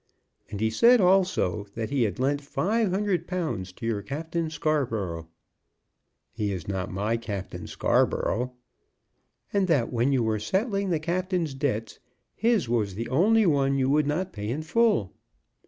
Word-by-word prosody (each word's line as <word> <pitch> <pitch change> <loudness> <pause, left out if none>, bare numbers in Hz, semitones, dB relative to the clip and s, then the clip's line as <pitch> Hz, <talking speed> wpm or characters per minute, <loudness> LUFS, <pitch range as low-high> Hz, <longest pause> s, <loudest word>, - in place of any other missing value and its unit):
And 100 - -5
he 110 +1 +1
said, 235 - +6
also, 180 - +2
that 115 +1 -4
he 140 -2 +1
had 100 -3 -3
lent 140 +3 0
five 205 +9 0
hundred 195 -1 0
pounds 160 - -3
to 115 - -8
your 110 -3 -1
Captain 160 - -3
Scarborough." 115 - -1 1.0
"He 105 -2 -2
is 90 -5 -5
not 95 0 -3
my 105 +4 -1
Captain 105 -5 -6
Scarborough." 125 +2 +1 1.0
"And 200 -2 +2
that 140 -8 +1
when 120 +3 +2
you 130 -3 +2
were 110 -1 0
settling 195 - -1
the 170 - +2
captain's 175 -1 -1
debts 135 -5 -2 0.3
his 225 - +1
was 110 -5 0
the 115 +3 -4
only 210 - +4
one 140 -4 +2
you 130 0 +2
would 150 0 +3
not 175 +5 -1
pay 105 +1 -5
in 145 +6 -2
full." 210 - +2
140 Hz, 155 wpm, -26 LUFS, 110-180 Hz, 1.0 s, said